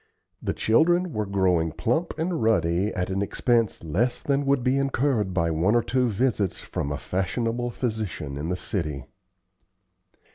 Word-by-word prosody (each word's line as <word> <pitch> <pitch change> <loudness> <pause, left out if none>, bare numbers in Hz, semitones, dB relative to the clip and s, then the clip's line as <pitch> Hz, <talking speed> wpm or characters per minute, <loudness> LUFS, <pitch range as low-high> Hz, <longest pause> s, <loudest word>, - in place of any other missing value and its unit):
The - - -2
children 175 +8 +3
were 105 -1 -2
growing 90 -4 +2
plump 120 - -1
and 165 +1 -1
ruddy 100 -2 +2
at 90 -1 -2
an 95 +1 0
expense 115 +1 +1
less 100 +11 0
than 140 0 0
would 140 -2 +2
be 130 +2 +2
incurred 135 -7 +1
by 85 -2 +1
one 85 +8 +2
or 120 - +3
two 125 +1 +1
visits 105 -3 0
from 70 - -4
a 75 - -2
fashionable 115 - -2
physician 110 - -3
in 75 +4 -4
the 90 - 0
city. 80 - -3
110 Hz, 155 wpm, -25 LUFS, 90-125 Hz, -, children